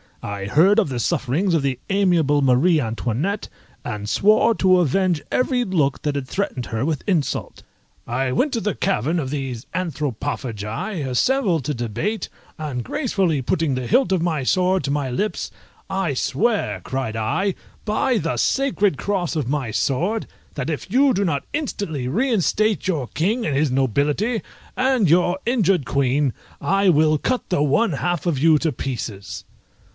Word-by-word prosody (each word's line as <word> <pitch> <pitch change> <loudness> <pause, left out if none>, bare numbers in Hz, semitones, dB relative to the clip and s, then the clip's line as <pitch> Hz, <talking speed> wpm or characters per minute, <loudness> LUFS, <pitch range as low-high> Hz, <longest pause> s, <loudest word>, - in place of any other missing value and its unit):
I 100 -1 -4
heard 175 - +4
of 205 - +1
the 125 -2 -3
sufferings 145 - 0
of 165 - +3
the 135 -2 -1
amiable 175 -7 +3
Marie 140 +6 +4
Antoinette, 125 - -2 0.4
and 105 0 -4
swore 215 - +4
to 185 -2 +4
avenge 175 0 +1
every 250 -1 +1
look 160 - 0
that 145 -1 -1
had 140 -2 -3
threatened 130 -8 -3
her 115 +3 -2
with 155 -3 -2
insult. 170 -8 -1 0.5
I 130 +2 -1
went 270 - +1
to 230 - 0
the 210 -6 -1
cavern 155 +10 0
of 135 -4 -3
these 135 -5 -4
Anthropophagi, 140 - -3
assembled 170 - +1
to 150 - -1
debate, 130 - -3 0.3
and 145 -6 -4
gracefully 195 - 0
putting 155 +3 0
the 130 -1 -3
hilt 260 - +3
of 185 -3 +2
my 160 -4 0
sword 185 +5 +2
to 140 - -1
my 145 -2 -1
lips 205 +13 -2 0.4
"I 190 -7 -1
swear," 205 - 0
cried 130 -4 -3
I, 145 - 0 0.3
"by 225 +4 +1
the 165 -4 -1
sacred 210 - +1
cross 185 -5 -1
of 145 -6 -1
my 140 -5 -1
sword, 175 - 0 0.3
that 130 - -3
if 160 +4 -4
you 265 +3 +4
do 200 +1 +1
not 145 -5 -1
instantly 200 - -3
reinstate 215 - +1
your 155 -9 -1
king 210 - -1
and 145 - 0
his 145 -1 +2
nobility, 145 - +1 0.3
and 255 - +2
your 175 +2 +3
injured 195 - +2
queen, 140 0 +1 0.3
I 195 0 +2
will 155 -2 +4
cut 255 - -1
the 150 -5 +2
one 160 +7 +2
half 175 +4 -1
of 170 -5 +1
you 160 +1 +5
to 160 - 0
pieces." 120 -6 -5
160 Hz, 160 wpm, -22 LUFS, 135-200 Hz, 0.5 s, you